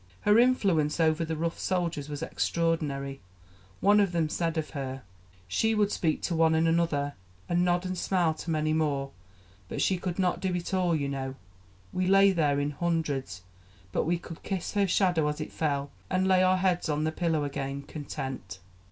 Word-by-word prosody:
Her 210 +2 +5
influence 190 -12 +3
over 160 0 +3
the 160 0 -2
rough 165 +1 -2
soldiers 170 -6 -1
was 145 +1 -4
extraordinary; 150 -6 -1 0.6
one 205 +1 +5
of 195 -3 +2
them 165 -2 +1
said 165 0 -1
of 155 - -2
her: 135 -3 -5 0.4
"She 220 - +1
would 210 -1 +2
speak 160 -3 0
to 170 - -1
one 160 0 +4
and 160 +1 +3
another, 165 -4 +1 0.3
and 175 0 +2
nod 175 0 +1
and 185 0 -2
smile 175 -2 +1
to 160 - -8
many 155 -1 +1
more; 140 -3 0 0.6
but - - -4
she 190 - +2
could 175 -1 -3
not 185 -2 +1
do 185 -2 -1
it 175 -1 -3
to 190 - -1
all, 175 -2 +2
you 140 -3 -1
know 135 -1 -4 0.6
we 185 0 0
lay 195 +1 +6
there 150 -6 +2
in 145 +1 -1
hundreds 145 - -2 0.5
but - - 0
we 170 +2 +1
could 165 -1 -10
kiss 190 -3 -3
her 200 -1 +2
shadow 175 -5 +2
as 150 +1 -2
it 155 - -5
fell, 140 -3 -1 0.2
and 185 0 +1
lay 185 -1 +5
our 185 0 +4
heads 180 -3 +1
on 150 0 0
the 155 - 0
pillow 160 -2 0
again, 140 0 -4
content." 135 - -6
165 Hz, 195 wpm, -28 LUFS, 145-180 Hz, 0.6 s, lay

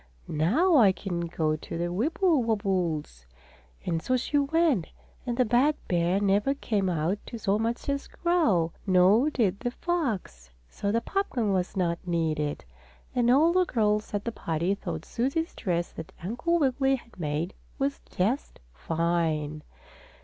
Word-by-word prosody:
"Now 290 - +3
I 210 -7 +7
can 175 -2 -3
go 155 -2 0
to 155 - -7
the 175 +1 -2
Wibblewobbles!" 200 - 0 0.6
And 165 -1 -1
so 255 +7 +1
she 290 +4 0
went, 285 - +2 0.4
and 240 -1 -1
the 255 - +4
bad 255 +7 +3
bear 175 +2 +2
never 205 +7 +2
came 205 -8 -1
out 175 +4 0
to 235 - -6
so 210 -1 0
much 230 +2 -2
as 280 0 -1
growl, 230 - +1
nor 195 +9 +5
did 205 -9 0
the 245 - -1
fox, 235 - -3 0.2
so 200 - -3
the 230 +2 +1
popgun 240 - -1
was 185 +1 -1
not 170 -2 0
needed. 155 - -1 0.5
And 240 -1 +2
all 305 +7 +5
the 370 0 +4
girls 210 -8 0
at 205 - -3
the 235 - -1
party 170 -2 -1
thought 200 - -5
Susie's 275 +8 -1
dress 175 -4 -2
that 160 - -9
Uncle 245 - 0
Wiggily 270 -2 +2
had 235 -6 -13
made 155 +3 -2 0.2
was 275 +1 -1
just 225 +10 -1
fine. 155 - -1
205 Hz, 150 wpm, -27 LUFS, 170-265 Hz, 0.6 s, I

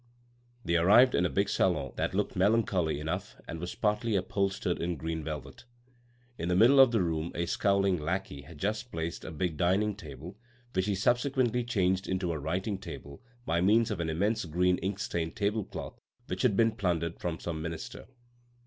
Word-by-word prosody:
They 85 0 +2
arrived 105 +10 +6
in 90 - +3
a - - -6
big 100 +1 +1
salon 80 -10 +1
that - - -2
looked - - -1
melancholy 95 -8 +2
enough 80 +1 -4
and 80 - -5
was 90 +2 -5
partly 105 +1 0
upholstered 95 -1 -1
in 85 +1 -1
green 80 +2 -3
velvet. 75 - -7 0.7
In 85 - -2
the 90 - +2
middle 120 +8 +6
of 135 -2 +9
the 115 -5 +1
room 80 -1 -2
a 85 - 0
scowling 100 +1 +2
lackey 85 -2 -3
had 75 +3 -13
just 110 - -2
placed 85 +1 -4
a - - -6
big 80 0 -2
dining 95 +5 +2
table 90 +2 -10 0.3
which 95 +1 0
he 100 - +1
subsequently 125 +3 +1
changed 95 -5 0
into 95 -2 -1
a 80 - -3
writing 95 +7 -2
table 70 -6 -9 0.2
by 85 +1 +1
means 110 +4 +4
of 100 - -3
an 85 -1 -1
immense 100 +8 0
green 90 +3 +1
inkstained 95 -4 -3
tablecloth 105 0 -3 0.3
which - - -4
had 115 -7 +2
been 115 -1 +4
plundered 85 -5 -1
from 85 -2 -3
some 80 -2 -4
minister. 85 0 -6
90 Hz, 180 wpm, -30 LUFS, 85-105 Hz, 0.7 s, of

